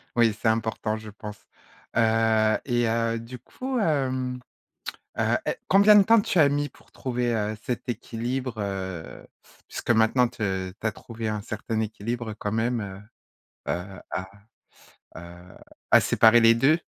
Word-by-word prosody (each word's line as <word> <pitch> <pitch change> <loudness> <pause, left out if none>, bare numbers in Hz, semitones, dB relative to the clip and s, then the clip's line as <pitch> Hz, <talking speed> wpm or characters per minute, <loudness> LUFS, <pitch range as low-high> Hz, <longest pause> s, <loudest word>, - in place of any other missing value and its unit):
Oui, 115 -3 +3
c'est 110 - +2
important, 110 -1 -1
je 110 -1 -9
pense. 105 0 -10 0.5
Heu 110 -1 +3
et 120 -3 +1
heu, 115 0 0
du 120 +2 -9
coup, 255 - -4
hem, 130 - 0 0.8
heu, - - +2
è - - -1
combien 200 +2 +7
de 200 - +7
temps 225 +1 +5
tu 185 - 0
as 145 -3 +6
mis 145 +1 -1
pour - - -23
trouver, 120 -2 -2
heu, 110 0 -1
cet 125 0 -4
équilibre, 120 +2 -3
heu, 95 -4 -5 0.4
puisque - - -2
maintenant, 120 +2 +4
tu 95 -5 -3
tu 110 - -1
as - - 0
trouvé 115 +1 -7
un 105 -1 -2
certain 110 +1 -4
équilibre 110 +1 -4
quand 105 -1 -4
même, 115 +1 0
heu 100 +2 -10 0.6
heu, 95 +2 -6
à, 95 0 -4 0.9
heu, 85 +1 -12 0.3
à - - +8
séparer 115 +1 +5
les 115 0 +6
2? 145 +8 +3
115 Hz, 155 wpm, -25 LUFS, 105-125 Hz, 0.9 s, à